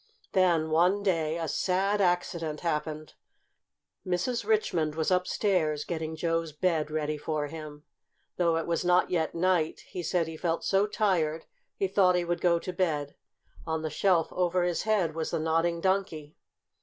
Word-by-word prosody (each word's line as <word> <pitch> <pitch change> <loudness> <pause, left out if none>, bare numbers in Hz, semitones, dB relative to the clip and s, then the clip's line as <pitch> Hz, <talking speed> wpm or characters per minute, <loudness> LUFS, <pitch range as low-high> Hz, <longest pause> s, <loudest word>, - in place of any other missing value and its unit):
Then, 170 -4 +2
one 180 +5 +3
day, 165 -5 0
a 165 -1 -3
sad 195 +5 +1
accident 170 -4 0
happened. 155 -2 -3 0.9
Mrs. 185 +7 -1
Richmond 175 - 0
was 160 +3 0
upstairs, 180 -4 +1
getting 160 -2 -4
Joe's 165 -1 -1
bed 160 -2 0
ready 155 -1 -2
for 150 0 -2
him. 150 -1 -9 0.5
Though 170 -2 +2
it 165 - -2
was 170 +1 -1
not 180 0 +3
yet 165 -3 0
night, 170 -2 +1
he 180 - -7
said 175 0 0
he 160 0 -7
felt 165 0 -1
so 195 +1 +2
tired 170 -7 0 0.3
he 195 - 0
thought 185 -1 +3
he 175 -1 0
would 175 0 -2
go 170 -1 +4
to 180 +2 -5
bed. 155 -6 -1 0.5
On 160 0 -2
the 155 - -3
shelf 170 0 +2
over 180 0 +1
his 175 -1 0
head 205 -7 +1
was 160 0 -3
the - - -1
Nodding 165 +2 0
Donkey. 175 -6 -1
170 Hz, 165 wpm, -28 LUFS, 155-185 Hz, 0.9 s, go